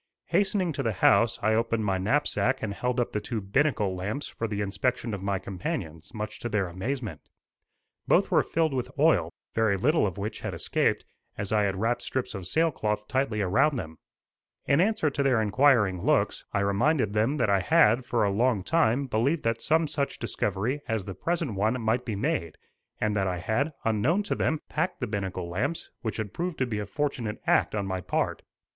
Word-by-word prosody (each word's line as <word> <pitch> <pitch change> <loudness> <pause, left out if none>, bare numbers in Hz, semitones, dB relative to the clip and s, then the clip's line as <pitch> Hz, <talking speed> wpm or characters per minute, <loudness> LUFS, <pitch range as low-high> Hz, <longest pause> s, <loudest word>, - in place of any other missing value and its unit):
Hastening 195 -3 +1
to 140 - -2
the 115 -4 0
house 100 +3 +4
I 110 +1 +3
opened 115 -1 +1
my 95 -2 +1
knapsack 130 +3 +1
and 105 -2 -2
held 125 +4 -1
up 120 - 0
the 105 - -1
two 115 +1 -3
binnacle 105 -1 +1
lamps 105 +10 -3
for 115 - -4
the 105 -2 -3
inspection 115 +3 -1
of 100 - -4
my 100 0 0
companions, 90 - -5
much 110 -2 -6
to 120 - -4
their 105 -4 0
amazement. 100 - -4 0.9
Both - - +3
were - - +5
filled 160 -3 0
with 125 -2 -2
oil, - - +4 0.2
very 110 -3 +2
little 140 - +3
of 95 - -5
which 105 +2 -4
had - - -4
escaped, - - 0 0.3
as 105 -1 -3
I 105 -1 +3
had 95 -1 0
wrapped 115 +5 0
strips 130 -3 -3
of 95 -4 -6
sailcloth 105 - 0
tightly 130 -5 0
around 135 +11 +3
them. 80 -7 -6 0.7
In 140 +3 +4
answer 200 -7 +2
to 140 - -1
their 135 -4 +3
inquiring 105 -4 +3
looks, - - +1
I 100 - 0
reminded 100 +4 +2
them 110 +8 +1
that 110 -6 +2
I 100 - +4
had, 125 - +4
for 120 -2 0
a 100 - +2
long 110 -1 +1
time, 140 - +2
believed 135 +7 0
that 115 0 0
some 160 +1 +2
such 145 -2 -2
discovery 115 +4 -2
as 110 -4 -1
the 95 - -5
present 165 - -2
one 110 +6 0
might 115 +2 0
be 110 -4 -2
made, 110 - -1 0.4
and 105 0 0
that 95 -2 +1
I 90 -1 -1
had, 110 - 0
unknown 120 - +2
to - - -1
them, 155 -1 0
packed 170 +5 -2
the 125 - -1
binnacle 95 -5 -3
lamps 125 - -3
which 110 -3 -3
had 110 -2 -4
proved 175 -1 -3
to 130 - +1
be 110 -4 -3
a 105 - -4
fortunate 120 -3 -2
act - - +2
on 100 -2 -1
my 95 -1 -3
part. - - -1
110 Hz, 200 wpm, -27 LUFS, 100-140 Hz, 0.9 s, were